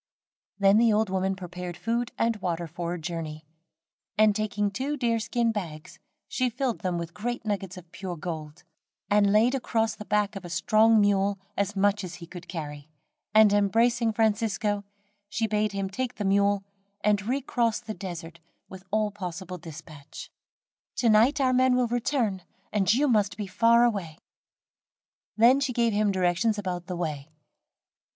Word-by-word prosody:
Then 200 Hz, +1 st, +5 dB
the 230 Hz, -1 st, +4 dB
old 215 Hz, -2 st, +1 dB
woman 190 Hz, 0 st, 0 dB
prepared 180 Hz, -1 st, -7 dB
food 235 Hz, +1 st, -1 dB
and 230 Hz, 0 st, +1 dB
water 175 Hz, -3 st, -2 dB
for 170 Hz, +1 st, -4 dB
a -, -, -7 dB
journey, 160 Hz, -2 st, -5 dB, 0.7 s
and 215 Hz, -1 st, +5 dB
taking 210 Hz, -1 st, -1 dB
two 275 Hz, +7 st, -3 dB
deer 235 Hz, -3 st, +1 dB
skin 230 Hz, +1 st, 0 dB
bags, 165 Hz, -8 st, -6 dB, 0.3 s
she 255 Hz, -1 st, 0 dB
filled 245 Hz, 0 st, -2 dB
them 180 Hz, -2 st, -2 dB
with 170 Hz, 0 st, -5 dB
great 240 Hz, +2 st, -4 dB
nuggets 195 Hz, -3 st, -3 dB
of 170 Hz, -2 st, -13 dB
pure 185 Hz, -3 st, -6 dB
gold, 155 Hz, -2 st, -6 dB, 0.5 s
and 205 Hz, -1 st, +4 dB
laid 225 Hz, +5 st, +4 dB
across 225 Hz, -4 st, 0 dB
the 210 Hz, -, -8 dB
back 210 Hz, 0 st, 0 dB
of 195 Hz, -, -6 dB
a 175 Hz, -, -8 dB
strong 215 Hz, +6 st, +4 dB
mule, 200 Hz, -1 st, +2 dB, 0.2 s
as 200 Hz, +1 st, -1 dB
much 205 Hz, +1 st, +2 dB
as 180 Hz, -2 st, -6 dB
he 170 Hz, -, -10 dB
could 175 Hz, +1 st, -11 dB
carry, 150 Hz, -3 st, -7 dB, 0.5 s
and 215 Hz, -1 st, +7 dB
embracing 230 Hz, +3 st, +2 dB
Francisco, 215 Hz, -1 st, 0 dB, 0.5 s
she 225 Hz, -, -1 dB
bade 215 Hz, -1 st, 0 dB
him 195 Hz, -1 st, -2 dB
take 250 Hz, +6 st, -4 dB
the 210 Hz, -, -3 dB
mule 200 Hz, 0 st, +2 dB, 0.4 s
and 205 Hz, -1 st, +2 dB
recross 245 Hz, -3 st, 0 dB
the 225 Hz, -2 st, -6 dB
desert 170 Hz, -4 st, -7 dB, 0.3 s
with 190 Hz, -1 st, -11 dB
all 215 Hz, +1 st, +1 dB
possible 185 Hz, -2 st, -6 dB
dispatch. 155 Hz, -3 st, -11 dB, 0.6 s
"To 235 Hz, -, +2 dB
night 235 Hz, +8 st, +4 dB
our 260 Hz, -2 st, +3 dB
men 255 Hz, 0 st, +4 dB
will 250 Hz, -1 st, +3 dB
return, 235 Hz, -4 st, -1 dB, 0.3 s
and 205 Hz, -1 st, +3 dB
you 275 Hz, +6 st, +3 dB
must 210 Hz, -5 st, +2 dB
be 210 Hz, -, -3 dB
far 230 Hz, +4 st, +4 dB
away." 195 Hz, -10 st, -1 dB, 1.2 s
Then 240 Hz, +5 st, +6 dB
she 270 Hz, -2 st, -1 dB
gave 235 Hz, -2 st, +2 dB
him 205 Hz, 0 st, +2 dB
directions 190 Hz, +4 st, +1 dB
about 180 Hz, -3 st, -4 dB
the 180 Hz, -, -4 dB
way. 155 Hz, -4 st, -4 dB
205 Hz, 165 wpm, -27 LUFS, 180-225 Hz, 1.2 s, and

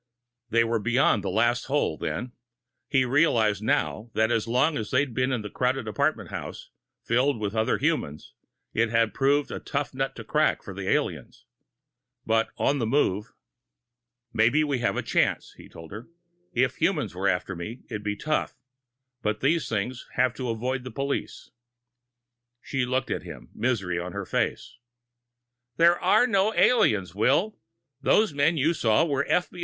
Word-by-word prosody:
They 115 Hz, 0 st, +3 dB
were 115 Hz, 0 st, 0 dB
beyond 120 Hz, -1 st, +2 dB
the -, -, -2 dB
last 120 Hz, +5 st, +1 dB
hole, 145 Hz, +2 st, 0 dB
then. 125 Hz, +1 st, -4 dB, 0.6 s
He 135 Hz, -3 st, +3 dB
realized 120 Hz, -7 st, +2 dB
now 110 Hz, +1 st, -1 dB
that 110 Hz, +1 st, +2 dB
as 115 Hz, -1 st, 0 dB
long 130 Hz, +7 st, +2 dB
as 110 Hz, -6 st, -3 dB
they'd 135 Hz, -1 st, +1 dB
been 130 Hz, +2 st, 0 dB
in 115 Hz, -5 st, -2 dB
a -, -, -4 dB
crowded 125 Hz, -1 st, -1 dB
apartment 115 Hz, -, -1 dB
house, -, -, -7 dB, 0.3 s
filled 125 Hz, +2 st, +2 dB
with 105 Hz, -1 st, -3 dB
other 110 Hz, 0 st, +1 dB
humans, 75 Hz, +1 st, -2 dB, 0.4 s
it 115 Hz, +1 st, +1 dB
had 115 Hz, -2 st, +2 dB
proved 140 Hz, +1 st, +1 dB
a -, -, -4 dB
tough 140 Hz, 0 st, -3 dB
nut 135 Hz, +1 st, -2 dB
to -, -, -8 dB
crack -, -, +1 dB
for -, -, -8 dB
the -, -, -4 dB
aliens. -, -, -2 dB, 0.8 s
But 115 Hz, 0 st, +2 dB
on 140 Hz, +1 st, +1 dB
the 115 Hz, -, 0 dB
move.... 110 Hz, -4 st, +1 dB, 1.0 s
"Maybe 120 Hz, +8 st, +3 dB
we 140 Hz, -4 st, -1 dB
have 115 Hz, -, 0 dB
a -, -, -1 dB
chance," -, -, 0 dB
he -, -, -14 dB
told 80 Hz, -1 st, -12 dB
her. 105 Hz, +4 st, -8 dB, 0.4 s
"If 130 Hz, +1 st, +1 dB
humans 160 Hz, -, 0 dB
were 95 Hz, +2 st, -1 dB
after 95 Hz, 0 st, -1 dB
me, 105 Hz, +9 st, -7 dB
it'd 105 Hz, -4 st, -5 dB
be 105 Hz, 0 st, -2 dB
tough 150 Hz, +8 st, -2 dB, 0.7 s
but 105 Hz, 0 st, -1 dB
these 140 Hz, -1 st, +1 dB
things 115 Hz, +4 st, -3 dB
have 130 Hz, -2 st, +2 dB
to 130 Hz, -2 st, -4 dB
avoid 125 Hz, +3 st, -2 dB
the 130 Hz, -, -6 dB
police." 140 Hz, +4 st, -4 dB, 1.1 s
She 130 Hz, -1 st, -2 dB
looked 130 Hz, +1 st, -1 dB
at -, -, -1 dB
him, 60 Hz, -1 st, -11 dB
misery 95 Hz, -9 st, -1 dB
on 90 Hz, +1 st, -6 dB
her 100 Hz, -1 st, -4 dB
face. -, -, -2 dB, 1.0 s
"There 170 Hz, +1 st, +5 dB
are 185 Hz, +6 st, +4 dB
no 205 Hz, -1 st, +1 dB
aliens, 110 Hz, -, +3 dB
Will. 140 Hz, -, +1 dB, 0.4 s
Those 215 Hz, +6 st, +3 dB
men 145 Hz, +4 st, +2 dB
you 155 Hz, +4 st, +2 dB
saw 115 Hz, 0 st, +2 dB
were 140 Hz, -3 st, -1 dB
F. 180 Hz, -, +1 dB
125 Hz, 170 wpm, -26 LUFS, 110-140 Hz, 1.1 s, There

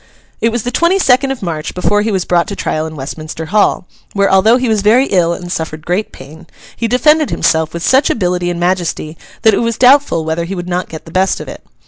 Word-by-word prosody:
It 230 Hz, -, +1 dB
was 235 Hz, -1 st, -2 dB
the 245 Hz, -, -3 dB
twenty 340 Hz, +8 st, +2 dB
second 270 Hz, -6 st, +3 dB
of 270 Hz, -6 st, -4 dB
March 160 Hz, -3 st, -4 dB
before 205 Hz, +3 st, +1 dB
he 220 Hz, +1 st, -1 dB
was 190 Hz, -3 st, -1 dB
brought 175 Hz, -1 st, +1 dB
to 200 Hz, -, -5 dB
trial 155 Hz, -4 st, -2 dB
in 160 Hz, -, -9 dB
Westminster 155 Hz, +3 st, -7 dB
Hall; 205 Hz, 0 st, +1 dB, 0.3 s
where, 200 Hz, -1 st, +1 dB
although 215 Hz, +5 st, +4 dB
he 255 Hz, 0 st, -1 dB
was 220 Hz, -2 st, +1 dB
very 230 Hz, +6 st, +4 dB
ill 175 Hz, -8 st, +1 dB
and 175 Hz, 0 st, -6 dB
suffered 160 Hz, -2 st, -5 dB
great 185 Hz, +5 st, -2 dB
pain, 150 Hz, +4 st, -13 dB, 0.3 s
he 230 Hz, -, -2 dB
defended 300 Hz, +6 st, +3 dB
himself 160 Hz, -1 st, 0 dB
with 170 Hz, 0 st, -6 dB
such 265 Hz, +2 st, +3 dB
ability 180 Hz, -3 st, -1 dB
and 175 Hz, -1 st, -3 dB
majesty, 175 Hz, -3 st, -2 dB, 0.3 s
that 220 Hz, -2 st, +5 dB
it -, -, +1 dB
was 230 Hz, -1 st, -1 dB
doubtful 255 Hz, -, +4 dB
whether 160 Hz, +1 st, -2 dB
he 190 Hz, +3 st, -5 dB
would 175 Hz, -1 st, -6 dB
not 180 Hz, 0 st, -3 dB
get 160 Hz, -, -9 dB
the 165 Hz, -, -12 dB
best 190 Hz, +2 st, +1 dB
of -, -, -8 dB
it. -, -, -10 dB
185 Hz, 240 wpm, -14 LUFS, 170-230 Hz, 0.3 s, that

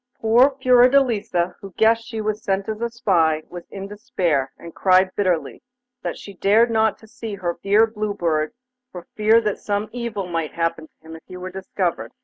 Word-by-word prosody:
Poor 245 Hz, +5 st, +4 dB
Fiordelisa, 245 Hz, -8 st, +3 dB
who 195 Hz, -2 st, -10 dB
guessed 225 Hz, +1 st, +3 dB
she 225 Hz, -3 st, -4 dB
was 215 Hz, 0 st, -3 dB
sent 195 Hz, 0 st, -1 dB
as 220 Hz, 0 st, -4 dB
a 235 Hz, -, -1 dB
spy, 165 Hz, -9 st, +1 dB
was 175 Hz, -1 st, -9 dB
in 195 Hz, 0 st, -7 dB
despair, 195 Hz, -, -1 dB
and 170 Hz, -, -11 dB
cried 185 Hz, 0 st, +3 dB
bitterly 185 Hz, -5 st, -1 dB, 0.4 s
that -, -, -4 dB
she 200 Hz, -, -10 dB
dared 215 Hz, +5 st, +3 dB
not 220 Hz, -2 st, +1 dB
see 220 Hz, -1 st, -7 dB
her 175 Hz, -3 st, -4 dB
dear 205 Hz, +3 st, +4 dB
Blue 215 Hz, -2 st, -4 dB
Bird 155 Hz, -4 st, 0 dB, 0.4 s
for 180 Hz, -2 st, -9 dB
fear 215 Hz, +2 st, +5 dB
that 210 Hz, -3 st, -2 dB
some 205 Hz, +1 st, -2 dB
evil 235 Hz, -5 st, -4 dB
might 165 Hz, -3 st, -3 dB
happen 165 Hz, -1 st, -2 dB
to 160 Hz, -, -23 dB
him 160 Hz, -, -9 dB
if 160 Hz, -, -12 dB
he 185 Hz, -, -9 dB
were 185 Hz, +1 st, -7 dB
discovered. 180 Hz, -, -3 dB
200 Hz, 185 wpm, -22 LUFS, 175-225 Hz, 0.4 s, fear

